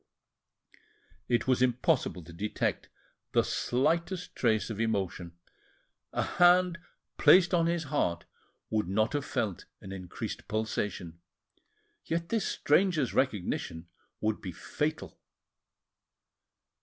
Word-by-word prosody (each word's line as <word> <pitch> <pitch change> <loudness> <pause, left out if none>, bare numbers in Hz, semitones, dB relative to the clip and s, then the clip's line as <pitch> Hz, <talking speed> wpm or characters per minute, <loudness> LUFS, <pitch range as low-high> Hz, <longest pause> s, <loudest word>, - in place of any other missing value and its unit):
It 120 -1 +2
was 130 -1 +2
impossible 125 - +1
to 85 +1 -12
detect 105 +5 -2 0.4
the - - +4
slightest 170 +8 0
trace 110 -2 +1
of 110 - -5
emotion, 95 -6 -2 0.7
a - - 0
hand 180 0 +4 0.4
placed 180 -1 +6
on 165 -1 +3
his 170 -1 0
heart 130 - -1 0.5
would 110 -4 +1
not 110 +6 +1
have 145 -1 -1
felt 110 -8 -2
an 95 - -10
increased 90 -2 -6
pulsation, 105 -6 -3 0.8
yet 170 +1 -2
this 225 -4 0
stranger's 155 -4 +2
recognition 90 -8 -1 0.3
would 110 0 0
be 95 - -5
fatal! 150 - -4
120 Hz, 105 wpm, -30 LUFS, -, 0.8 s, placed